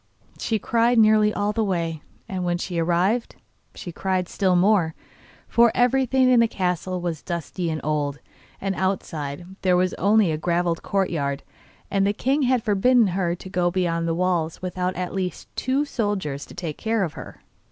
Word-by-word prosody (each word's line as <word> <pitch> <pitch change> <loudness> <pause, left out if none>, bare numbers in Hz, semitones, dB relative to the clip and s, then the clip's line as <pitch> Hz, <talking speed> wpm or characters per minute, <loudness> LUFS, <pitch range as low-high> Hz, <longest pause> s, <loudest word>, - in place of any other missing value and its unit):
She 225 - 0
cried 235 +3 +2
nearly 215 -1 +5
all 205 0 -1
the 225 - 0
way, 170 -5 -2 0.3
and 185 -2 -3
when 175 0 0
she 175 -1 -3
arrived 180 +8 +1 0.4
she 175 - -7
cried 185 +1 -1
still 185 -1 +1
more, 180 -3 +3 0.5
for 235 -1 +4
everything 260 +1 +3
in 250 -1 +5
the 230 - +5
castle 180 -2 -2
was 170 -3 -3
dusty 170 +1 -4
and 155 -1 -2
old, 145 -2 -1 0.4
and 195 0 -2
outside 175 -5 -3 0.2
there 180 -1 +3
was 185 0 +1
only 205 -2 +4
a 155 - -2
gravelled 170 0 0
courtyard, 150 -8 -1 0.5
and 195 -1 +2
the 205 - +1
king 270 +7 0
had 255 -3 +2
forbidden 220 +2 +3
her 175 -2 0
to 180 - -11
go 180 -1 +1
beyond 170 -2 0
the 165 - 0
walls 175 -3 0
without 185 0 -2
at 180 0 -4
least 185 -3 -3
two 270 +3 0
soldiers 200 - -2
to - - -13
take 165 -4 -5
care 225 -2 0
of 165 -5 -3
her. - - -11
185 Hz, 175 wpm, -23 LUFS, 170-215 Hz, 0.5 s, nearly